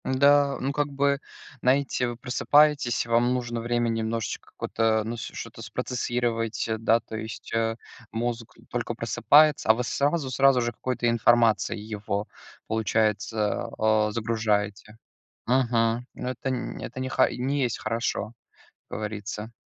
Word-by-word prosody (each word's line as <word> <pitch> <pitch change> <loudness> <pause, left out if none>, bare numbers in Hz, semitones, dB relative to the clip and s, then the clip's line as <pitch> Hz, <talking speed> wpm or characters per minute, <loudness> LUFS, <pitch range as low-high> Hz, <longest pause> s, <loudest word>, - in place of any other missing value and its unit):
М, - - -1
да, 140 0 +5
ну 135 - 0
как 145 +1 0
бы, 140 0 +1 0.4
знаете, 130 -1 +2
вы 120 - -4
просыпаетесь, 140 0 +3
вам 120 +1 +2
нужно 120 -2 -2
время 120 0 0
немножечко 115 0 -3
какое-то, 110 -1 0
ну, 115 +2 -4
ш - - -7
что-то - - -8
спроцессировать, 120 -3 -2
э, 110 - 0
да, 115 +1 +3
то 110 0 -9
есть, 110 0 -7
э, 115 0 +1 0.4
мозг 115 0 -3
только - - -2
просыпается, 150 -4 +4
а - - +9
вы 125 - -2
сразу 140 +3 0
сразу 135 -1 +4
же 120 0 -1
какой-то 120 +1 -2
информацией 115 -2 +3
его, 100 0 -3 0.4
получается, 110 0 0
э, 110 -1 +3
загружаете. 105 -2 -1 0.5
Мгм, 120 -1 +2
ну - - -5
это 130 +1 -4
н 125 -2 -4
это 125 - -7
не 130 0 -3
ха 130 - +3
ни 130 +3 -2
есть 120 -3 -1
хорошо, 115 -1 -2 0.6
как - - -5
говорится. 105 +1 -5
115 Hz, 145 wpm, -26 LUFS, 110-130 Hz, 0.6 s, а